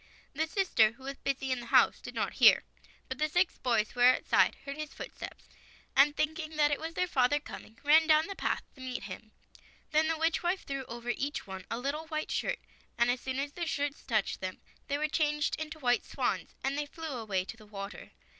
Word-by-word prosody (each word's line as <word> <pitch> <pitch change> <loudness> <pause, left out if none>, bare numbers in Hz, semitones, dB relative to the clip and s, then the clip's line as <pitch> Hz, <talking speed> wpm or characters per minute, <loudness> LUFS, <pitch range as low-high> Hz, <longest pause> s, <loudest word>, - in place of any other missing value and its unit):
The 315 +3 0
sister, 315 - +3
who 260 - -18
was 275 +1 -6
busy 270 -1 -1
in 255 - 0
the 240 - -8
house, - - +5
did - - -8
not - - -1
hear; - - +8 0.4
but 260 +1 -5
the 305 0 +1
six 355 +3 +1
boys, 230 -4 +1
who 245 - -10
were 250 +1 +7
outside, - - +3
heard 280 +1 -5
the 305 0 -4
footsteps, - - -9 0.5
and 290 +2 +5
thinking 315 0 -1
it 295 -1 +2
was 325 +1 -5
their 365 - +2
father 290 -3 +2
coming, 225 -6 -10
ran 315 +2 +6
down 310 0 +5
the 395 - -6
path - - -1
to 265 - -15
meet 255 -1 -4
him. 220 -1 -8 0.6
Then 310 +1 +4
the 325 0 0
witch 325 +1 +1
wife 355 +2 0
threw 275 -1 -4
over 235 +1 -4
each 280 +4 -3
one 190 -1 -8
a 230 - -2
little 285 +5 -3
white 310 -1 -3
shirt, - - 0 0.4
and 235 +1 +4
as 245 0 -2
soon 260 0 -3
as 280 +1 -2
the 340 +2 -4
shirts 290 -3 -2
touched 215 -6 -1
them, 185 0 -4 0.3
they 285 - 0
were 305 +1 +1
changed 300 -1 +1
into 315 0 -5
white 245 -5 +2
swans, - - -2
and 270 +1 0
they 295 0 -2
flew 320 +2 -7
away 205 -6 -1
to 225 - -7
the 215 -2 -16
water. 200 -1 -7
280 Hz, 220 wpm, -31 LUFS, 245-310 Hz, 0.6 s, hear